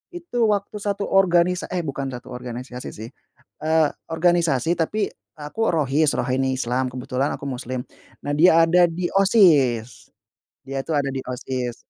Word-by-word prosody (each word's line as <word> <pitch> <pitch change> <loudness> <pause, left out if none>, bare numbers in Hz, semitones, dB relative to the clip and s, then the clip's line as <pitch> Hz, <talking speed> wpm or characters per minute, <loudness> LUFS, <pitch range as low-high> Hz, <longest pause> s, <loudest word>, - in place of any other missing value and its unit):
itu 340 -8 -7
waktu 205 -1 -1
1 200 0 -2
organisa 180 -2 +2
eh, 180 -1 -3
bukan 140 -2 -4
1 125 +1 -11
organisasi, 125 0 -7
sih, 110 +2 -8 0.5
eee, 160 -1 +3 0.2
organisasi, 165 -3 +1
tapi 205 +5 -1 0.3
aku 150 +10 -2
Rohis, 150 -1 +2
Rohani 130 +1 0
Islam, 130 +1 -1
kebetulan 130 +2 -2
aku - - -9
muslim, 125 -1 -4 0.4
nah, 145 - -1
dia 160 +3 +5
ada 175 +1 +5
di 175 +2 -4
OSIS, 135 - +3 0.6
dia, 135 0 -4
tuh, 160 - 0
ada 140 -1 -1
di 135 - -4
OSIS. 125 -1 -4
145 Hz, 145 wpm, -22 LUFS, 130-175 Hz, 0.6 s, dia